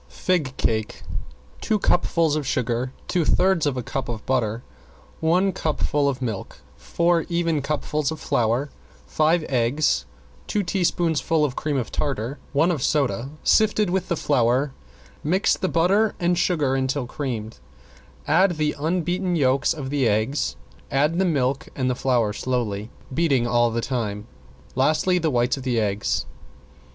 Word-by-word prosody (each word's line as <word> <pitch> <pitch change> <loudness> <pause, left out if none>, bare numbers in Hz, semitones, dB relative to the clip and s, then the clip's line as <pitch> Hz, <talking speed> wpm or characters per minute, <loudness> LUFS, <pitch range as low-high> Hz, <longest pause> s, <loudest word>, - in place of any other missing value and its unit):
~FIG 155 -8 -1
CAKE~ 110 -1 -1 0.6
Two 215 - +1
cupfuls 170 -5 +2
of 150 -3 -2
sugar, 125 0 -1 0.2
two 175 - +1
thirds 180 -1 +2
of 135 -3 -1
a 125 - -2
cup 135 +3 -4
of 110 -3 -5
butter, 120 -3 0 0.6
one 180 +4 +2
cupful 150 -3 0
of 130 -1 -3
milk, 110 -5 -4 0.2
four 165 - +1
even 170 -3 0
cupfuls 150 0 -1
of 160 - -5
flour, 120 +5 0 0.3
five 155 - +2
eggs, 130 +4 +1 0.4
two 210 - 0
teaspoonfuls 165 -4 +1
of 135 -3 -3
cream 150 -1 -1
of 125 - -3
tartar, 135 -1 -2
one 160 +5 +3
of 155 -7 -2
soda, 135 -3 0
sifted 215 -3 +3
with 190 0 0
the 170 - 0
flour, 130 0 +2 0.5
mix 185 +6 +2
the 185 - -2
butter 195 +6 +2
and 175 0 +2
sugar 155 -7 +1
until 130 0 0
creamed, 120 -5 -5 0.7
add 185 -3 +3
the 155 -1 +1
unbeaten 175 +3 0
yolks 135 -3 +2
of 140 -5 -4
the 140 -4 +2
eggs, 110 - 0 0.3
add 150 +5 +1
the 190 - +3
milk 135 -5 0
and 130 -2 0
the - - +1
flour 120 -5 +1
slowly, 110 -3 -2 0.2
beating 140 -6 +2
all 120 0 +3
the 115 +1 -2
time, 110 -5 -3 0.5
lastly 155 +7 +2
the 160 -2 +1
whites 125 0 +1
of - - -6
the 125 -3 0
eggs. 100 -1 0
140 Hz, 150 wpm, -23 LUFS, 125-170 Hz, 0.7 s, one